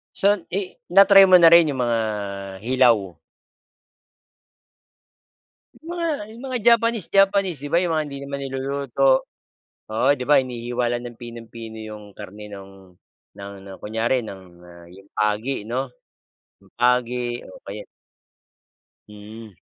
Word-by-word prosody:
So 205 +1 +3 0.2
i 195 -1 -4 0.2
na-try 195 0 +8
mo 185 - +4
na 165 - +9
rin 165 -4 +6
yung 130 - -2
mga 120 -1 +1 0.6
hilaw? 115 - +2 2.7
Yung 330 - -10
mga 335 - -1 0.2
yung 230 +3 -12
mga 255 -1 -2
Japanese 230 -3 +3
Japanese 195 -4 +3
,'di 145 +2 -7
ba, 170 - +3
yung 175 -2 -1
mga 155 -1 0
hindi 140 -1 -7
naman 140 0 -5
niluluto. 135 0 0 0.7
Oo, 110 - +1
di 125 - -4
ba 145 - +5
hinihiwa 120 -1 -4
lang 120 0 -3
ng 120 -1 -10
pinung-pino 115 -1 -10
yung 110 -1 -9
karne 105 +1 -10
nung 95 -2 -13 0.4
ng 100 0 -8
ng 95 -1 -11
kunyari 115 +4 -1
ng, 95 -3 -9 0.2
ah, 85 -1 -15
yung 95 +2 -16
pagi, 105 +5 -1
'no? 130 +3 -2 0.7
Yung 100 -1 -24
pagi 125 0 0
o - - -14
kaya 105 +2 -8 1.2
Hmm. 105 +1 -12
120 Hz, 135 wpm, -22 LUFS, 105-150 Hz, 2.7 s, na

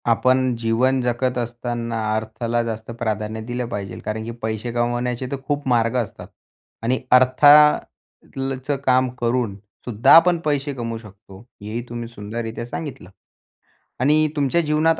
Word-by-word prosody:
आपण 130 +2 +2
जीवन 120 +4 +2
जगत 125 +1 -1
असताना 120 -1 -3 0.2
अर्थाला 110 +2 -2
जास्त 110 -1 -5
प्राधान्य 110 0 -2
दिलं 125 0 -3
पाहिजे 100 -3 -5
कारण 110 +1 -3
की 115 - -5
पैसे 110 +1 -3
कमवण्याचे 120 +1 -1
तर 140 - -2
खूप 145 -1 -2
मार्ग 115 -1 +2
असतात 115 -5 -4 0.6
आणि 125 +3 +1
अर्था 130 +3 +6 0.9
ल 135 0 -2
चं 145 - +1
काम 130 0 +3
करून 120 -3 0 0.3
सुद्धा 115 -2 +4
आपण 170 +1 +6
पैसे 145 -1 0
कमवू 115 -3 -4
शकतो, 100 -3 -14 0.2
हेही 110 +3 -4
तुम्ही 120 0 -5
सुंदररित्या 115 +1 -6
सांगितलं. 120 - -7 0.9
आणि 150 +4 +3
तुमच्या 145 +3 +2
जीवनात 155 +1 +2
120 Hz, 140 wpm, -22 LUFS, 115-130 Hz, 0.9 s, अर्था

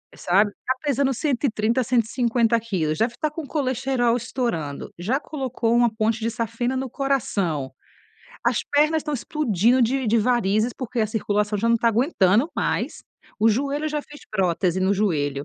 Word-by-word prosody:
"Sabe? 200 +4 +2
Tá 260 - +1
pesando 280 -2 +1
130, 250 -3 0
150 235 -1 +1
quilos, 180 -9 -2
deve 230 +4 0
tá 310 - 0
com 310 +2 -6
o - - -9
colesterol 260 -4 0
estourando, 230 - -3
já 220 +11 0
colocou 255 -6 -2
uma 240 -1 +3
ponte 220 0 0
de 230 +1 -1
safena 230 +3 -2
no 260 0 -3
coração, 200 - -1 0.7
as - - +1
pernas 305 +2 +2
estão 300 0 -4
explodindo 245 - +1
de 260 +2 +1
de 225 +2 +3
varizes, 225 -1 +1
porque 245 0 -4
a 215 - +2
circulação 210 -1 -1
já 230 +3 +1
não 230 - +4
tá 230 +1 +2
aguentando 230 - +2
mais, - - -1 0.4
o 220 +1 +4
joelho, 280 +7 0
já 300 0 -2
fez 295 0 -14
prótese 185 -2 0
no 190 +2 +2
joelho 145 -9 0
230 Hz, 165 wpm, -23 LUFS, 210-265 Hz, 0.7 s, não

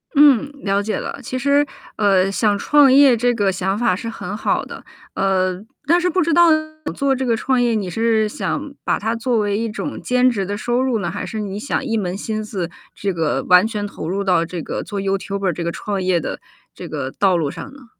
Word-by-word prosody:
嗯， 285 -1 +5
了 200 0 +1
解 210 +1 -2
了。 - - -5
其 255 - -4
实， 280 +2 +3 0.3
呃， 195 -2 +3
想 205 0 +1
创 290 +4 +5
业 270 -2 +6
这 245 +2 +2
个 205 -4 +1
想 190 +1 -1
法 215 -5 +2
是 230 - -6
很 205 -3 -6
好 - - 0
的。 - - -10 0.3
呃， 185 -1 0 0.2
但 340 +3 +5
是 355 - 0
不 365 +1 +1
知 335 - +1
道 345 +2 +6 0.5
做 275 -1 +1
这 260 0 -2
个 235 -2 +2
创 255 +2 0
业， 240 -1 +2
你 205 -4 -1
是 220 +2 +1
想 290 +6 -4
把 - - 0
它 225 +2 -1
作 235 0 0
为 205 -1 0
一 230 +1 -1
种 285 +7 -5
兼 250 0 +3
职 205 -6 -2
的 200 +2 -3
收 240 +4 0
入 255 -4 0
呢， - - -2
还 - - -5
是 220 - -5
你 200 -2 -4
想 270 +4 -2
一 230 -4 -1
门 185 -3 -2
心 215 +1 -4
思 190 -6 -4 0.2
这 200 - -2
个 165 -4 -1
完 180 +2 +7
全 210 -2 -3
投 180 - -7
入 195 +3 -1
到 180 -4 +2
这 170 0 -5
个 - - -4
做 200 -2 -4
YouTuber 195 0 -1
这 170 - -4
个 170 - -1
创 200 +2 -3
业 180 -2 +2
的 - - -5 0.4
这 - - -8
个 130 - -4
道 190 +2 +2
路 160 -4 0
上 275 - -8
呢？ 270 -3 -15
210 Hz, 270 characters per minute, -20 LUFS, 195-250 Hz, 0.5 s, 完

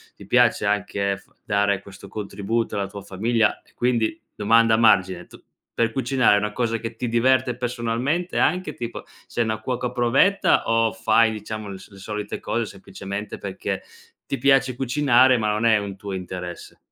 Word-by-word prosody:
ti 100 - -13
piace 120 -1 +3
anche 100 -1 0
f 100 - -20 0.2
dare 100 -1 +1
questo 100 0 -12
contributo 105 +3 -3
alla 100 -1 -1
tua 100 +1 -9
famiglia. 110 +3 0
E - - -28
quindi, 120 +4 0 0.2
domanda 115 +1 +4
margine: 95 -6 +3
tu - - -16 0.3
per 115 -1 +1
cucinare 125 -2 +3
è - - +4
una 105 +1 -1
cosa 115 0 -1
che 115 0 -6
ti 125 - -3
diverte 125 +1 +2
personalmente 125 +7 -2
anche, 185 +1 +1
tipo 120 -1 -6 0.2
sei 120 - -1
una 110 -1 -2
cuoca 125 +2 -3
provetta, 125 +11 +3
o 115 -1 +3
fai 110 +1 +3
diciamo 110 0 -6
le 95 - -8
so - - -15
le - - -13
solite 105 +1 -5
cose, 115 0 -2
semplicemente, 100 +1 -7
perché 100 -1 -4 0.5
ti 135 - -2
piace 135 -1 +3
cucinare 130 -1 +4
ma 105 -1 0
non 105 +2 0
è 110 -2 +5
un 100 -1 -5
tuo 100 0 -7
interesse? 90 -1 -7
110 Hz, 175 wpm, -23 LUFS, 100-120 Hz, 0.5 s, è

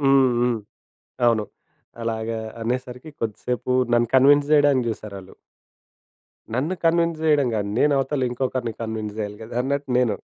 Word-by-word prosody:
హ్మ్. 135 -2 +4
హ్మ్. 120 -1 +1 0.7
అవును. 115 -3 +3 0.6
అలాగా 115 0 -2 0.2
అనేసరికి 125 +4 -4
కొద్దిసేపు 115 +2 -3 0.2
నన్ను 120 0 +3
కన్విన్స్ 145 +2 +5
జేయడానికి 145 -4 +4
చూసారాళ్ళు. 100 -3 -8 1.2
నన్ను 145 +10 -1
కన్విన్స్ 165 -1 +2
జేయడం 150 -4 +3
గాదు. 100 -1 -2
నేను 145 0 +4
అవతల 135 -1 0
ఇంకొకరిని 125 -2 -2
కన్విన్స్ 110 -2 -4
జేయాలి 105 -1 -4
కదా 110 - -9
అన్నట్టు 140 +1 -2
నేను. 115 -5 +2
125 Hz, 130 wpm, -23 LUFS, 110-140 Hz, 1.2 s, కన్విన్స్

